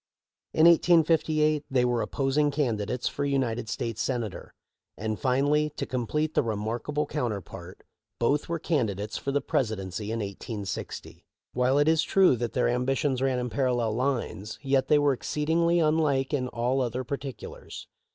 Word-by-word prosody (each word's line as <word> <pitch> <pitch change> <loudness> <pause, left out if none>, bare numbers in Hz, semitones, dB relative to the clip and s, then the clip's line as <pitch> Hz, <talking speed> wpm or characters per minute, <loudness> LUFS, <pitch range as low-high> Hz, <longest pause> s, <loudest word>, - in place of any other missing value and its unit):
In 160 - +4
1858 160 -3 +4
they 125 -2 +2
were 120 -1 +1
opposing 135 +6 +1
candidates 125 -5 -1
for 145 - -3
United 125 -5 -1
States 115 0 -3
Senator; 120 -6 -3 0.5
and 110 -1 -3
finally, 145 +4 +2
to - - -3
complete 150 +5 -2
the - - +3
remarkable 115 +6 -2
counterpart, 100 - -5 0.3
both 140 +7 +1
were 170 - 0
candidates 110 - -1
for 140 - -3
the 145 +1 +1
Presidency 105 -7 -2
in 115 - -2
1860. 100 0 -6 0.3
While 125 +2 +2
it 145 +1 +3
is 160 0 +4
true 190 -8 +4
that 120 0 -3
their 125 - +2
ambitions 130 +2 0
ran 135 -1 +1
in 125 -1 -3
parallel 120 -2 +1
lines, 120 -4 -2
yet 135 -1 +2
they 150 - +5
were 145 -1 +3
exceedingly 165 +6 +1
unlike 155 -4 +1
in 130 -3 0
all 125 +2 0
other 125 +1 -2
particulars. 135 0 -7
130 Hz, 150 wpm, -27 LUFS, 115-150 Hz, 0.5 s, they